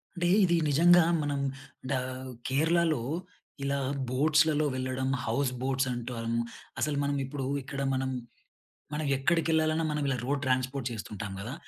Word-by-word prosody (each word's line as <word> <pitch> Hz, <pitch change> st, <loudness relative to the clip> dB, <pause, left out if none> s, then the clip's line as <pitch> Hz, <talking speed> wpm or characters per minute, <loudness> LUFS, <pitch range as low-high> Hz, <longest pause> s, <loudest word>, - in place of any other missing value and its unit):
అంటే 175 Hz, -1 st, 0 dB, 0.2 s
ఇది 175 Hz, -2 st, +4 dB
నిజంగా 175 Hz, +4 st, +6 dB, 0.2 s
మనం 145 Hz, -1 st, -1 dB, 0.5 s
డ -, -, +1 dB, 0.5 s
కేరళలో 160 Hz, 0 st, +2 dB, 0.6 s
ఇలా 140 Hz, 0 st, 0 dB, 0.3 s
బోట్స్‌లలో 150 Hz, +3 st, +3 dB
వెళ్లడం 130 Hz, 0 st, -2 dB, 0.2 s
హౌస్ 140 Hz, -2 st, +1 dB
బోట్స్ 135 Hz, 0 st, +1 dB
అంటాము. 115 Hz, -1 st, -2 dB, 0.4 s
అసలు 150 Hz, -2 st, 0 dB
మనం 140 Hz, 0 st, 0 dB
ఇప్పుడు 135 Hz, 0 st, -4 dB, 0.2 s
ఇక్కడ 140 Hz, +1 st, -5 dB
మనం 130 Hz, 0 st, 0 dB, 0.9 s
మనం 150 Hz, 0 st, -2 dB
ఎక్కడికి 165 Hz, +4 st, +1 dB
వెళ్ళాలన్నా 160 Hz, 0 st, +2 dB
మనం 150 Hz, 0 st, -1 dB
ఇలా 135 Hz, -, +1 dB
రోడ్ 140 Hz, +1 st, -1 dB
ట్రాన్స్‌పోర్ట్ 130 Hz, 0 st, 0 dB
చేస్తుంటాం 105 Hz, -2 st, -6 dB
గదా! 115 Hz, +7 st, -5 dB
140 Hz, 135 wpm, -29 LUFS, 130-155 Hz, 0.9 s, నిజంగా